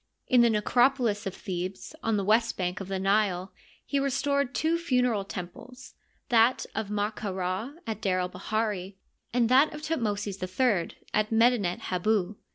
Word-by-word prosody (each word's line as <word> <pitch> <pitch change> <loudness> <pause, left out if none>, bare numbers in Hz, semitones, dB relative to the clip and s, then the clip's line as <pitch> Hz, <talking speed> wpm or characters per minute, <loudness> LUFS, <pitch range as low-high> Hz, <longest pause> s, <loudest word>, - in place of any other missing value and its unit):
In 250 -1 +5
the 235 - +5
necropolis 230 -1 +2
of 195 - -5
Thebes, 185 +2 -5
on 225 -1 +1
the 200 - 0
west 225 +3 +2
bank 180 -1 -2
of 195 - -6
the 195 0 -2
Nile, 195 -1 +1 0.3
he 280 - 0
restored 280 0 0
two 330 +2 +1
funereal 250 -9 +1
temples, 200 +8 -9 0.4
that 235 +1 +4
of 215 -1 -3
Ma 210 0 0
ka 210 -1 -5
Ra 185 +7 -3
at 220 -2 -4
D^r 185 -2 +1
el 180 - 0
bahiri, 200 -1 -2 0.4
and 240 -1 +2
that 270 +4 +5
of 300 - -9
Thutmosis 210 -10 -2
III 185 -1 0 0.2
at 215 0 +1
Medinet 225 -5 +3
Hibu. 200 +1 +1
215 Hz, 165 wpm, -28 LUFS, 190-245 Hz, 0.4 s, In